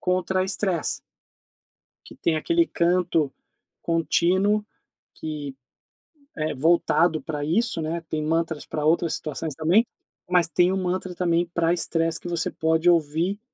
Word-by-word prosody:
contra 185 Hz, +1 st, 0 dB
estresse 190 Hz, -3 st, -1 dB, 1.1 s
que -, -, -13 dB
tem 160 Hz, -, 0 dB
aquele 335 Hz, -, +2 dB
canto 170 Hz, -4 st, +1 dB, 0.5 s
contínuo 185 Hz, +5 st, +2 dB, 0.5 s
que 150 Hz, -3 st, -6 dB, 0.8 s
é 155 Hz, -1 st, -2 dB
voltado 165 Hz, +2 st, +3 dB
pra 150 Hz, -3 st, -4 dB
isso, 170 Hz, +2 st, 0 dB
né, 165 Hz, +2 st, -3 dB
tem 155 Hz, -1 st, -2 dB
mantras 160 Hz, 0 st, -1 dB
pra 150 Hz, -1 st, -3 dB
outras 165 Hz, +1 st, +2 dB
situações 155 Hz, 0 st, -5 dB
também, 175 Hz, -, +3 dB, 0.4 s
mas 180 Hz, -2 st, +3 dB
tem 175 Hz, +3 st, +3 dB
o 190 Hz, -, 0 dB
mantra 185 Hz, 0 st, -2 dB
também 175 Hz, -1 st, +1 dB
pra 170 Hz, 0 st, +1 dB
estresse, 165 Hz, -1 st, 0 dB
que -, -, -7 dB
você 170 Hz, -2 st, -1 dB
pode 160 Hz, +1 st, +1 dB
ouvir, 170 Hz, +4 st, +1 dB
170 Hz, 135 wpm, -24 LUFS, 160-180 Hz, 1.1 s, voltado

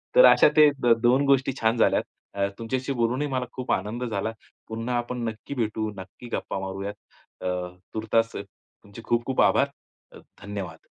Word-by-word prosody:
तर -, -, +9 dB
अशा -, -, +7 dB
त्या 145 Hz, -6 st, +5 dB
2 125 Hz, +4 st, +4 dB
गोष्टी 135 Hz, -1 st, +3 dB
छान 115 Hz, +1 st, +2 dB
झाल्या. 115 Hz, -, +4 dB, 0.6 s
तुमच्याशी 130 Hz, +4 st, -2 dB
बोलूनही 125 Hz, +4 st, 0 dB
मला 130 Hz, -2 st, -1 dB
खूप 130 Hz, 0 st, -4 dB
आनंद 105 Hz, +6 st, -1 dB
झाला. 110 Hz, -2 st, -2 dB, 0.4 s
पुन्हा 115 Hz, +2 st, -3 dB
आपण 120 Hz, +1 st, -3 dB
नक्की 110 Hz, +4 st, -5 dB
भेटू, 110 Hz, -2 st, -1 dB
नक्की 95 Hz, +6 st, -10 dB
गप्पा 95 Hz, -, -3 dB
मारूयात. 95 Hz, +1 st, -4 dB, 0.5 s
अ, -, -, -6 dB, 0.5 s
तूर्तास 115 Hz, +1 st, +1 dB
तुमचे 100 Hz, +1 st, -12 dB
खूप 120 Hz, 0 st, +1 dB
खूप 130 Hz, -, +1 dB
आभार. 140 Hz, -, +4 dB, 0.4 s
अ, -, -, -13 dB, 0.2 s
धन्यवाद. 95 Hz, -6 st, -7 dB
115 Hz, 155 wpm, -26 LUFS, 105-130 Hz, 0.6 s, तर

